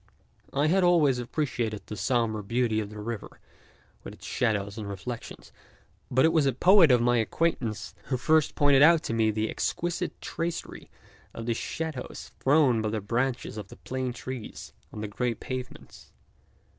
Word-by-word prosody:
I 140 +2 +1
had 185 +4 +3
always 155 -8 +4
appreciated 120 -5 -2
the 105 - -6
sombre 110 +1 0
beauty 115 +1 +1
of 105 -2 -4
the 105 - -10
river 115 0 -6 0.6
with - - -8
its - - -14
shadows 100 -2 -1
and 105 -3 -6
reflections, 100 +5 -7 0.6
but 130 +4 +4
it 160 - +3
was 155 -4 +3
a 135 - +2
poet 180 - +6
of 125 -2 +4
my 120 0 +3
acquaintance 115 -3 -1
who 130 - -1
first 155 +3 +2
pointed 145 -2 +5
out 165 +1 +6
to - - -3
me 110 -1 +3
the 110 +1 0
exquisite 175 +8 -2
tracery 165 0 -5 0.5
of 115 - -6
the 120 - +1
shadows 160 +4 -5
thrown 135 -5 +4
by 110 - -1
the 110 0 -1
branches 120 +3 -2
of 105 -3 -6
the - - -13
plane 130 -1 -3
trees 125 -1 -7 0.2
on 105 - -7
the 105 - -3
grey 120 +3 -1
pavements. 130 +3 -8
125 Hz, 170 wpm, -27 LUFS, 110-145 Hz, 0.6 s, poet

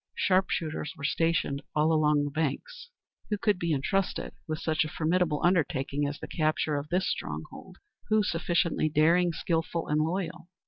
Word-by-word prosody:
Sharpshooters 185 -3 0
were 140 - -10
stationed 150 -2 +1
all 155 +2 +3
along 150 -2 +3
the 145 - -3
banks. 160 - -3 0.4
Who 210 - 0
could 205 -2 +1
be 170 -1 -1
entrusted 180 +7 -1
with 155 -1 -2
such 155 0 +1
a 155 - -5
formidable 165 -1 +1
undertaking 145 -5 +1
as 145 0 -4
the - - -7
capture 155 -1 0
of 145 +1 -4
this 185 +2 +1
stronghold? - - -5 0.3
Who 215 -1 +4
sufficiently 170 -3 +1
daring, 165 +4 +4
skilful, 165 0 -2
and 150 +1 +2
loyal? 175 +2 -3
160 Hz, 155 wpm, -28 LUFS, 150-180 Hz, 0.4 s, Who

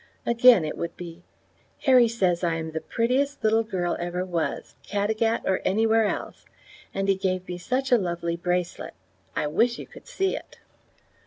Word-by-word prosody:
Again 235 -6 +6
it 155 - -5
would 170 0 -4
be: 175 0 -9 0.6
"Harry 255 -4 +6
says 185 -6 0
I 170 -1 +1
am 160 0 -4
the 160 0 -4
prettiest 265 +5 0
little 220 +1 +4
girl 185 -6 -2
ever 175 +1 -2
was, 170 -3 -3
Caddagat 220 +3 0
or 190 - +1
anywhere 220 +3 +3
else, - - -5 0.5
and 195 0 -2
he 195 - +5
gave 185 -1 -2
me 180 0 -5
such 255 +8 -2
a 245 - +6
lovely 170 -2 -2
bracelet. 175 0 -2 0.4
I - - 0
wish 235 +11 +1
you - - -7
could - - -15
see 385 -6 -1
it." - - -10
195 Hz, 170 wpm, -25 LUFS, 175-230 Hz, 0.6 s, Again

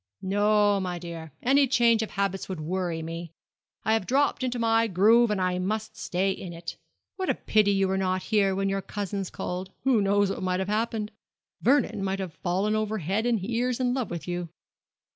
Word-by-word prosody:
'No, 205 +1 +3
my 180 -2 -3
dear; 165 -2 -8
any 275 +2 +4
change 235 -2 +4
of 220 - -3
habits 195 -1 -2
would 185 -4 -4
worry 170 0 -2
me. 165 0 -6 0.5
I 220 - +3
have 220 -4 0
dropped 275 +1 +2
into 250 -1 -1
my 230 0 +3
groove 220 +5 +5
and 210 -2 0
I 180 -1 0
must 215 +3 -2
stay 195 -2 -1
in 180 -2 -6
it. 170 0 -7 0.4
What 375 -1 -2
a - - +2
pity 215 -1 +2
you 195 -1 +2
were 190 0 0
not 185 -1 0
here 200 -3 +2
when 195 0 0
your 195 0 -1
cousins 200 -1 -4
called! 185 +1 -5
Who 250 -5 +3
knows 200 0 +2
what - - -5
might 185 0 0
have 190 +1 -2
happened? 215 0 -1 0.5
Vernon 250 -6 +2
might 195 0 -1
have 190 -4 -5
fallen 190 +6 0
over 215 0 -1
head 195 +6 -1
and 220 -5 0
ears 245 +1 0
in 250 -1 +1
love 255 -5 -2
with 170 -1 -6
you.' 175 -1 -3
200 Hz, 200 wpm, -27 LUFS, 185-220 Hz, 0.5 s, groove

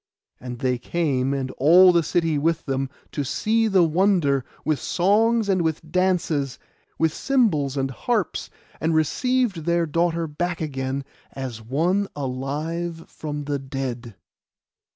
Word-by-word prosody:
And 125 -1 -7
they 125 0 0
came, 135 -3 0
and 135 -2 -2
all 175 +7 +7
the 170 -1 +3
city 165 -2 0
with 165 +2 0
them, 135 -1 -1 0.2
to 145 - -2
see 220 - +1
the 195 -4 +4
wonder, 165 -5 +2 0.2
with 155 -2 +1
songs 220 +4 +2
and 190 -3 +2
with 160 -1 -2
dances, 170 -7 +1 0.4
with 160 -1 +2
cymbals 160 - +1
and 135 0 -1
harps, 125 - -1 0.3
and 160 0 +1
received 200 - +1
their 170 0 +2
daughter 170 +1 0
back 175 +3 -3
again, 135 -2 -3 0.3
as 130 -4 -6
one 170 - 0
alive 150 +6 -4
from 150 -1 -5
the 145 0 -2
dead. 130 -4 -5
155 Hz, 135 wpm, -23 LUFS, 135-175 Hz, 0.4 s, all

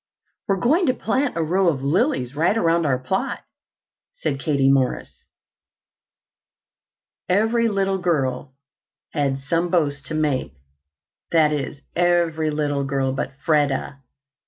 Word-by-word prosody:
"We're 195 - +2
going 310 - +2
to 255 - +2
plant 255 -1 -1
a 165 - +1
row 185 +4 +1
of 140 -5 0
lilies 145 - 0
right 170 +8 +2
around 165 -4 +2
our 130 -2 +2
plot," 190 - -2 0.7
said 140 - -3
Katie 135 -2 +2
Morris. 135 -2 -1 2.0
Every 225 +5 +2
little 195 -2 0
girl 135 -6 -1 0.6
had 140 -3 0
some 165 +6 -1
boast 145 -5 0
to 160 - -4
make, 150 - -1 0.8
that 155 -2 +4
is, 145 0 -4
every 170 -3 +2
little 145 -2 -1
girl 135 -1 -1
but 135 - -3
Freda. 145 -2 +1
155 Hz, 125 wpm, -22 LUFS, 140-185 Hz, 2.0 s, that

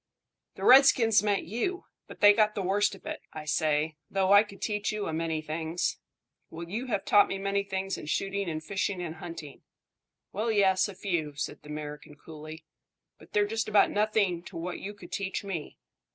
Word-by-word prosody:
The - - -8
redskins 250 -4 +7
meant 205 -1 +1
you; 245 - -3 0.2
but - - -12
they 205 -1 +9
got 215 0 +2
the 200 - -2
worst 200 +2 +1
of 195 - -18
it. - - -5
I 155 -1 -7
say, 155 0 0
though, 195 0 +2
I 205 - +9
could 205 -2 -9
teach 210 -2 -1
you 215 -1 -3
a 160 - -3
many 160 -1 -2
things." 160 +2 -2 0.5
"Well, 165 +1 -8
you 225 +8 -4
have 205 -5 -2
taught 205 - +6
me 195 - -3
many 200 +1 0
things 195 -1 -3
in - - -9
shooting 195 +3 -1
and 155 -1 -4
fishing 195 +1 -2
and 170 -2 -5
hunting." 160 -4 -9 0.7
"Well, 220 +3 0
yes, 190 -2 +3
a 200 - -9
few," 165 -7 -2
said 145 - -5
the 150 - -14
American 150 0 -7
coolly; 155 +1 -11 0.5
"but - - -18
they're 205 0 +3
just 220 +1 -2
about 210 -1 +4
nothing 205 -4 +1
to - - -9
what 175 +2 -4
you 205 +1 -7
could 205 - -13
teach 195 0 -3
me." 180 -7 -5
195 Hz, 195 wpm, -28 LUFS, 160-205 Hz, 0.7 s, they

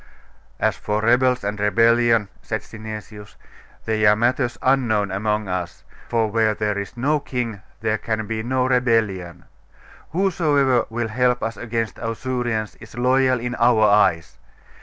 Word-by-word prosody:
'As - - +1
for 105 0 -2
rebels 125 +1 +3
and 105 +1 -3
rebellion,' 115 +1 +3
said - - -3
Synesius, 110 -1 -9 0.5
'they 110 -1 +2
are 105 - +6
matters 120 +2 0
unknown 115 -7 +2
among 105 +2 -1
as; 90 -2 -4 0.3
for 115 -1 +2
where 110 -1 +2
there 105 -1 -1
is 100 +4 -6
no 145 +5 +1
king 120 -7 -4 0.2
there 110 -1 0
can 110 -1 -2
be 110 0 -3
no 125 +2 0
rebellion. 115 -9 0 0.6
Whosoever 150 - +2
will 115 0 -3
help 125 +2 +1
us 115 0 -2
against 115 -2 -3
Ausurians 115 -1 -3
is 110 +1 -13
loyal 130 0 +2
in 120 +1 -4
our 115 -2 +4
eyes. 100 -5 +2
115 Hz, 140 wpm, -22 LUFS, 105-125 Hz, 0.6 s, are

